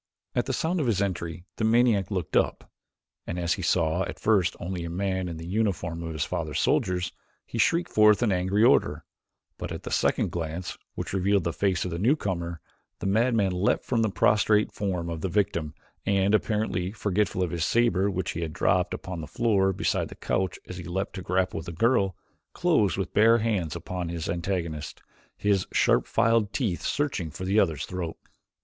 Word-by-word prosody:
At - - 0
the - - 0
sound 170 +3 0
of 145 - 0
his 105 -5 +1
entry 85 -3 -3
the - - -2
maniac 110 -4 +3
looked 90 -6 -3
up, - - +1 0.6
and 85 - -3
as 85 -1 +1
he 95 - -5
saw 85 0 +1
at - - -6
first 100 -4 +2
only 90 -1 -4
a 85 - -4
man 95 +1 -1
in 85 - -6
the 80 - -7
uniform 90 -4 -1
of 80 -1 -5
his 75 -2 -1
father's - - -3
soldiers, 90 -1 +1 0.3
he 115 - -5
shrieked 170 +9 +2
forth 105 +1 +5
an 115 - +2
angry 95 +3 +2
order, 80 - +3 0.5
but - - -5
at - - -6
the - - -6
second - - +1
glance, 85 +1 -4 0.2
which - - -5
revealed 100 0 +2
the 85 - -1
face 95 -3 0
of 90 - -3
the 85 - -3
newcomer, 95 - 0 0.4
the - - -7
madman 110 0 +2
leaped 90 +3 +1
from 120 -3 0
the 110 - +2
prostrate 105 +1 +3
form 90 -4 -2
of 85 -2 -4
his 95 - -2
victim 85 -6 0 0.3
and, 100 0 +2
apparently 105 -4 0
forgetful 105 -2 0
of 90 - -2
the 85 - -3
saber 100 +2 +2
which 95 -2 -2
he 85 - -4
had 80 -2 -3
dropped - - +1
upon 90 -3 -6
the 75 - -7
floor 100 -5 +2
beside 95 - 0
the - - -10
couch 95 -3 -1
as 90 - -7
he 90 - -6
leaped 95 +3 -3
to 95 - -6
grapple 95 +1 0
with 80 - -10
the - - -4
girl, 100 0 +2 0.4
closed 135 - +2
with 95 -3 -3
bare 115 +2 +6
hands 105 -9 -1
upon 85 0 -4
his 85 -2 -4
antagonist, 85 -4 -3 0.4
his 100 -3 +1
sharp - - +3
filed 115 -2 +2
teeth 105 -11 -1
searching 135 - -1
for 95 +5 -7
the 100 +3 +3
other's 80 -7 +1
throat. 90 -3 -5
95 Hz, 195 wpm, -27 LUFS, 85-105 Hz, 0.6 s, bare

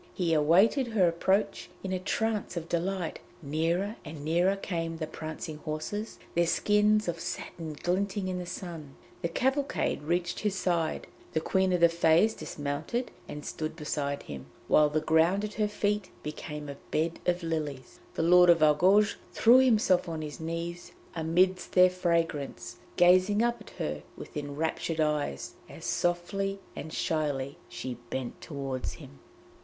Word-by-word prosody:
He 170 -3 +1
awaited 185 - +4
her 210 -6 +3
approach 190 +5 0
in 190 -1 -2
a 185 - 0
trance 210 -1 -1
of 165 -1 -4
delight; 175 +1 -2 0.2
nearer 170 +8 0
and 150 -2 -8
nearer 175 +5 +3
came 165 -4 -3
the 160 - -2
prancing 155 0 -6
horses, 155 +8 -4 0.2
their 170 0 +2
skins 210 +3 +3
of 170 -1 -2
satin 165 -2 -5
glinting 190 +5 -1
in 185 -1 -2
the 180 - -6
sun. 165 -7 -7 0.3
The - - 0
cavalcade 265 - 0
reached 175 +3 -1
his 210 -2 -1
side; 170 -4 0 0.3
the 160 - +2
Queen 190 +3 +1
of 180 -1 +1
the 170 - +9
Fées 170 +5 +3
dismounted 150 - -3 0.2
and 150 0 -7
stood 155 0 -4
beside 145 -3 -3
him, 70 -2 -8 0.2
while 150 -1 +5
the 155 +1 0
ground 160 +6 +3
at 210 0 -4
her 215 -2 +1
feet 205 -1 -1
became 150 0 -6
a 140 -1 -7
bed 165 +2 0
of 180 0 +1
lilies. 150 -6 -4 0.2
The - - 0
Lord 180 +1 +7
of 165 -2 +6
Argouges 185 +8 +5 0.2
threw 240 +3 +7
himself 215 -9 +3
on 160 -1 -4
his 150 -1 -7
knees 165 +2 -5 0.2
amidst 180 +3 +1
their 180 0 +7
fragrance, 170 -5 -1 0.2
gazing 185 +4 +5
up 235 -1 0
at - - -12
her 75 0 -3 0.2
with - - -10
enraptured 150 +2 -2
eyes, 150 - -1 0.2
as - - -10
softly 195 +3 -1 0.2
and 160 - -6
shyly 145 -4 -1
she 120 +1 -6
bent 130 -2 -4
toward 135 -4 -4
him. 70 - -9
170 Hz, 155 wpm, -29 LUFS, 155-190 Hz, 0.3 s, the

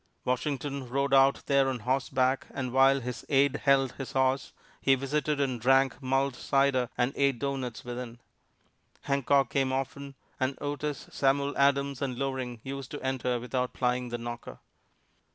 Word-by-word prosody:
Washington 135 0 -2
rode 140 +2 0
out 135 0 +5
there 140 -1 +3
on 125 -3 -3
horseback, 130 +1 0
and 130 -2 -4
while 135 +1 +5
his 125 0 -5
aide 140 -1 +3
held 135 -2 +4
his 135 0 -7
horse, 130 0 +1 0.3
he 135 - +4
visited 145 +2 -1
and 130 -4 -1
drank 135 +3 +3
mulled 135 0 0
cider 135 -2 +1
and 125 +2 +1
ate 140 -2 +2
doughnuts 130 -3 -4
within. 120 -1 -6 0.8
Hancock 140 -1 +2
came 135 -1 +1
often, 135 +1 -4 0.2
and 130 +1 -1
Otis, 145 0 -3
Samuel 140 +1 +1
Adams 140 -1 +2
and 130 -3 -2
Loring 130 -3 -3
used 135 0 -6
to 150 - -7
enter 125 -2 -1
without 125 +1 -2
plying 125 0 0
the 120 - -3
knocker. 120 0 -7
135 Hz, 150 wpm, -29 LUFS, 125-140 Hz, 0.8 s, out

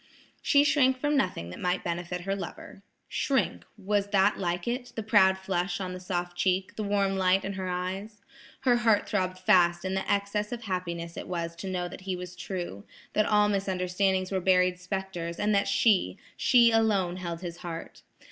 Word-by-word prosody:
She 285 0 +4
shrank 265 -3 +3
from 295 +3 0
nothing 180 - -1
that - - -9
might 180 0 -1
benefit 175 +1 -3
her 195 +2 -2
lover. 195 0 -8 0.3
Shrink! 265 0 0
was 205 0 0
that 200 0 +3
like 175 0 -2
it, 245 +1 -3
the 225 - -3
proud 200 -3 +5
flush 185 -1 -2
on 185 -1 -4
the 185 - -6
soft 175 -1 -3
cheek, 185 +1 0
the - - -4
warm 200 -1 +1
light 190 0 +3
in 195 - -3
her 190 -1 -4
eyes? 190 +4 -4 0.4
Her 250 -2 +4
heart 225 -3 +2
throbbed 185 -2 -1
fast 180 -2 +3
in 185 - -1
the 190 - -1
excess 200 +1 -1
of 240 -1 -5
happiness 170 -4 -4
it - - -6
was 170 -2 -3
to 190 +2 -5
know 180 -1 -2
that 175 - -10
he 185 0 -3
was 180 0 -8
true, 175 - -5 0.3
that 215 - +2
all 210 -1 +4
misunderstandings 190 -1 0
were 190 -1 0
buried 180 0 +3
spectres, 180 -2 -4
and 210 +1 +1
that 200 0 +2
she–she 225 - +3
alone 205 -6 +2
held 170 -2 -5
his 170 -2 -6
heart. 170 -2 -7
190 Hz, 185 wpm, -28 LUFS, 180-205 Hz, 0.4 s, proud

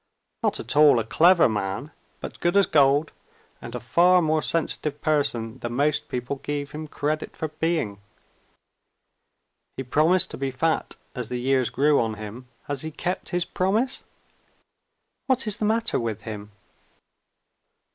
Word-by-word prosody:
Not - - 0
at - - -5
all 150 -3 +7
a 115 - +1
clever 170 - +5
man 105 +6 -3 0.3
but - - -7
good 175 +3 +1
as 200 - +6
gold, 145 0 +3 0.5
and - - -8
a - - -3
far 180 +1 +4
more 155 -2 +1
sensitive 150 -3 -1
person 130 -7 0
than 120 0 -4
most 145 +4 +1
people 125 +3 -3
gave 145 +1 -4
him 155 +1 -6
credit 155 +1 -3
for 160 - -3
being. 155 -10 -2 1.8
He 135 - -3
promised 160 +8 +2
to - - -8
be 135 0 -1
fat 155 +5 -1 0.2
as 125 -4 -5
years 125 0 +1
grew 145 +1 +3
on 110 -2 -2
him. 110 +4 -9 0.2
Has 145 -2 -4
he 160 - -4
kept 175 +4 -4
his 175 -1 -1
promise? 215 +8 0 1.3
What 260 -1 +1
is 210 -1 -1
the 215 - 0
matter 225 +2 +1
with 110 -2 -3
him?" 105 -1 -8
145 Hz, 150 wpm, -25 LUFS, 125-165 Hz, 1.8 s, all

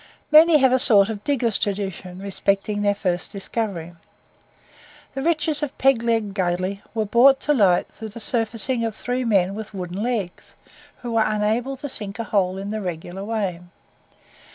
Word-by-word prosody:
Many 315 +1 +7
have 265 -3 +4
a 260 - +4
sort 205 -4 +5
of 210 -2 -5
digger's 240 -7 0
tradition 190 -3 -3
respecting 200 +1 -1
their 205 0 +2
first 180 -3 -2
discovery. 195 -4 -4 1.2
The 270 - -4
riches 310 -1 +1
of 290 -2 -4
Peg 270 -3 +3
Leg 225 -3 0
Gully 185 +1 -2
were 220 -1 0
brought 255 +6 +5
to 295 - +2
light 195 -9 +3
through 220 0 -8
the 225 +3 -9
surfacing 230 +2 0
of 225 -2 -2
three 250 +2 -3
men 195 -5 +2
with 215 0 -8
wooden 180 +1 -5
legs, 220 -7 -4 0.5
who 240 - -4
were 225 -1 +3
unable 220 +6 -1
to 285 +2 -6
sink 205 -6 -4
a 230 - -3
hole 190 -4 0
in 195 +1 -5
the 215 0 -3
regular 180 +1 -6
way. 200 -5 -2
215 Hz, 170 wpm, -22 LUFS, 195-240 Hz, 1.2 s, Many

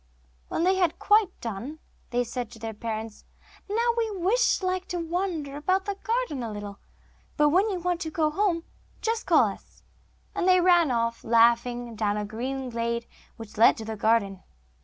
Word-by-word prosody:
When 330 - -1
they 375 +1 +3
had 360 -3 +1
quite 420 -2 +4
done, 235 +7 -5 0.3
they 245 0 +1
said 245 -1 -5
to 235 - -13
their 225 0 -5
parents: 220 0 -5 0.5
'Now 465 +3 +1
we 425 -3 0
should - - +2
like 370 0 -1
to 360 - -3
wander 335 -4 -3
about 370 +6 0
the 405 - -1
garden 450 - -2
a 230 -2 -4
little, 205 -1 -7 0.6
but 295 0 +5
when 375 +8 +3
you 385 - -2
want 355 0 -1
to 320 - -3
go 310 -1 0
home, 340 -1 0 0.4
just 455 0 -1
call - - +5
to - - -4
us.' - - -27 0.5
And 360 - -1
they 365 0 +6
ran 350 -3 +5
off, 230 -1 -1
laughing, 235 +1 +2
down 210 -1 0
a 210 - -2
green 255 +4 -4
glade, 235 0 -2 0.3
which 225 -1 -11
led 230 - +6
to 220 - -6
the 220 0 -4
garden. 205 -3 +1
285 Hz, 185 wpm, -26 LUFS, 230-370 Hz, 0.6 s, they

